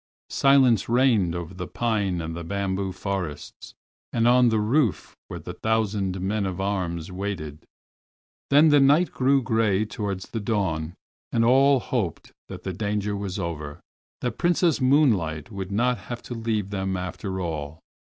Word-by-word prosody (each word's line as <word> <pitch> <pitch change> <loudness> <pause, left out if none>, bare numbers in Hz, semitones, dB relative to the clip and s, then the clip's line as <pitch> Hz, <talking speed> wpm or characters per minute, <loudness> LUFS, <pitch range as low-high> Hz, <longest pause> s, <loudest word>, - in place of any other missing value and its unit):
Silence 135 -7 +4
reigned 115 -8 +3
over 85 +1 -5
the 90 -1 -6
pine 100 -7 -1
and 80 0 -5
the 85 - -5
bamboo 95 +1 -2
forests, 90 -5 -5 0.4
and 115 0 +2
on 125 0 +5
the 110 -1 +1
roof 115 - 0
where - - -6
the - - -7
thousand 105 -4 -1
men 100 +2 -1
at 95 -1 -5
arms 90 -4 -2
waited. 90 -6 -5 0.8
Then 150 +3 +6
the 145 -1 +6
night 145 +6 +4
grew 135 +1 +2
gray 110 -3 +1
towards 100 -3 -5
the 115 - -2
dawn 95 -6 -1 0.4
and 115 -1 +2
all 135 +2 +5
hoped 110 - -3 0.2
that - - -9
the - - -3
danger 105 -1 -2
was 100 -1 -4
over—that 85 +7 -6
Princess 175 -4 +2
Moonlight 115 - +2
would 95 -2 -5
not 120 +4 +1
have 120 -1 -7
to - - -7
leave 110 -4 -2
them 95 -1 -2
after 95 +1 -4
all. 80 -3 -4
100 Hz, 155 wpm, -25 LUFS, 90-120 Hz, 0.8 s, Then